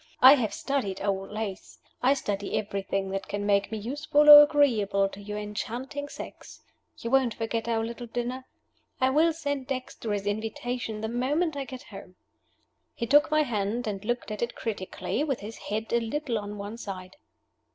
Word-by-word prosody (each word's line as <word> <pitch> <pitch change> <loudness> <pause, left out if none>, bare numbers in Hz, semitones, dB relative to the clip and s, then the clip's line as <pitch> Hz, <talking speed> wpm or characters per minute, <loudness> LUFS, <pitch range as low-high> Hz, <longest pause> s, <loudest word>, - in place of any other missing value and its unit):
I 260 +2 +10
have 245 -7 +1
studied 235 -9 -2
old 195 -1 -1
lace. 210 -3 -5 0.2
I 265 +3 +4
study 205 -6 -2
everything 195 -1 -2
that 195 0 -3
can 205 0 -3
make 200 0 +2
me 220 - -2
useful 290 +6 +4
or 295 0 +14
agreeable 225 -10 +3
to 195 - -11
your 210 +1 -5
enchanting 235 +7 -4
sex. - - -10 0.3
You 230 - -5
won't 260 -4 +3
forget 225 0 -2
our 225 -1 0
little 235 +1 -6
dinner? 245 +2 -4 0.5
I 260 0 +3
will 320 +4 +4
send 285 -5 -3
Dexter 255 -4 -4
his 200 -1 -2
invitation 220 +2 -3
the 220 - -2
moment 285 +8 0
I 280 -1 -3
get 260 -1 -9
home." 195 -2 -12 0.8
He 235 - -2
took 290 +6 +5
my 305 0 +3
hand 225 -1 -2
and 200 -2 -4
looked 240 0 -2
at 210 - -5
it 235 0 -2
critically, 220 +5 -3
with 275 -5 -2
his 215 +2 -8
head 220 +2 -3
a 235 - +4
little 235 0 -2
on 205 0 -7
one 205 +3 -6
side. 185 -3 -7
230 Hz, 180 wpm, -27 LUFS, 205-265 Hz, 0.8 s, or